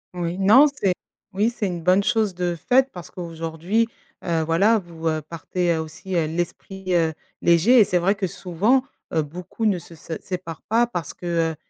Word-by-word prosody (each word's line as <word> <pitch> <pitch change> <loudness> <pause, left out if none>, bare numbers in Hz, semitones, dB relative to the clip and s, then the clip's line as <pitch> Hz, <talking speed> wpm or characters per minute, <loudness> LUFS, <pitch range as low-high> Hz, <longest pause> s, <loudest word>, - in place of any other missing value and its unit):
Oui, 175 +1 -3
non 215 +9 +7
c'est 240 -10 0 0.4
oui 210 +5 +2
c'est 220 -3 -2
une 175 -3 -4
bonne 185 +3 +4
chose 220 -3 +1
de 175 -1 -1
faite 255 - +3
parce 175 -2 -10
qu'aujourd'hui, 170 +5 -2 0.4
heu, 165 -2 +1
voilà 195 +8 +3
vous, 165 -3 -6
heu, 155 -1 0
partez, 170 +3 -2
heu, 160 - -1
aussi, 160 +4 -6
heu, 165 -2 +2
l'esprit, 180 +3 -3
heu, 165 -2 +2 0.3
léger 175 +9 +5
et - - +9
c'est 180 -3 +1
vrai 190 +4 +2
que 200 -1 -2
souvent, 195 +9 +1 0.3
heu, 160 - +3
beaucoup 175 +8 -4
ne 200 -3 +2
se 170 - -12
se 165 +1 -8
séparent 175 -4 -6
pas 235 +2 +2
parce 175 -10 -5
que, 170 -2 -1
heu, - - -8
180 Hz, 195 wpm, -23 LUFS, 165-200 Hz, 0.4 s, et